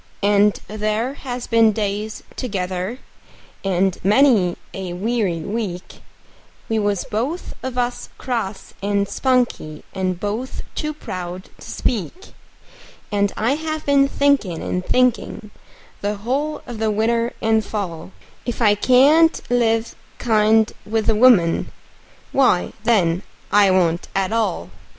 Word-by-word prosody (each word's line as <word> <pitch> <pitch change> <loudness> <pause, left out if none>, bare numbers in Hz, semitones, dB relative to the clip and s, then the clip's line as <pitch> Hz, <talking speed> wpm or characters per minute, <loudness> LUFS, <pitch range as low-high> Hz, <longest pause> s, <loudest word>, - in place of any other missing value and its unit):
And 205 0 +4
there 215 +4 -1
has 250 -3 -6
been 225 -2 +4
days 210 +1 -3
together 190 -1 -3 0.7
and 190 -1 +1
many 210 -4 +4 0.2
a 185 -2 -5
weary 195 -3 -1
week 195 -1 -5 0.7
We 225 -1 0
was 205 -3 0
both 260 +12 -3
of 260 -1 -5
us 245 0 -2
cross 225 -6 -4
and 200 0 0
spunky, 245 - 0
and 185 -2 -2
both 215 +6 -4
too 305 -1 -3
proud 185 -8 -7
to - - -11
speak; 250 - -3 0.8
And 200 -1 +1
I 225 +4 +1
have 310 +1 -4
been 280 -1 +4
thinkin' 275 - +1
and 180 - -2
thinkin', 245 -2 0 0.5
the 205 +1 -1
whole 270 +9 -2
of 240 -3 -7
the 220 -1 +1
winter 230 +3 +1
and 220 -1 +2
fall, 185 -6 -5 0.3
If 240 - -4
I 215 -4 +5
can't 280 +9 +5
live 225 -2 +1 0.2
kind 220 -1 +3
with 220 +1 0
a - - +1
woman, 210 -8 +4 0.6
why, 250 -10 +2
then, 180 -7 +3 0.3
I 205 -1 +5
won't 175 -2 +2
at 195 +2 0
all. 225 -1 -1
215 Hz, 125 wpm, -21 LUFS, 195-245 Hz, 0.8 s, I